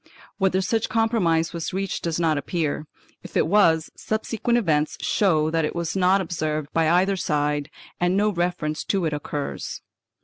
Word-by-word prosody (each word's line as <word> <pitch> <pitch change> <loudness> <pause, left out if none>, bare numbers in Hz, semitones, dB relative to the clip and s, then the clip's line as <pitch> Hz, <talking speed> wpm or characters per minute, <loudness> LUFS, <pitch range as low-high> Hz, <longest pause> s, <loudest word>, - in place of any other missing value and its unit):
Whether 190 -1 +2
such 220 +3 0
compromise 195 -8 +1
was 170 0 -4
reached 195 0 -2
does 165 -1 -2
not 160 -2 +2
appear; 150 0 -2 0.3
if - - -5
it - - +3
was, 165 -4 +3
subsequent 225 +2 -1
events 155 -9 +1
show 160 -6 +2
that 165 0 +1
it 150 - -2
was 170 +1 -2
not 190 +1 +3
observed 155 -4 -3
by 165 -1 +3
either 185 +3 +3
side 150 -4 -1 0.3
and 175 +2 +2
no 210 +1 +3
reference 175 -4 -2
to 195 -4 0
it 155 - -1
occurs. 145 -1 -4
170 Hz, 165 wpm, -24 LUFS, 155-195 Hz, 0.3 s, it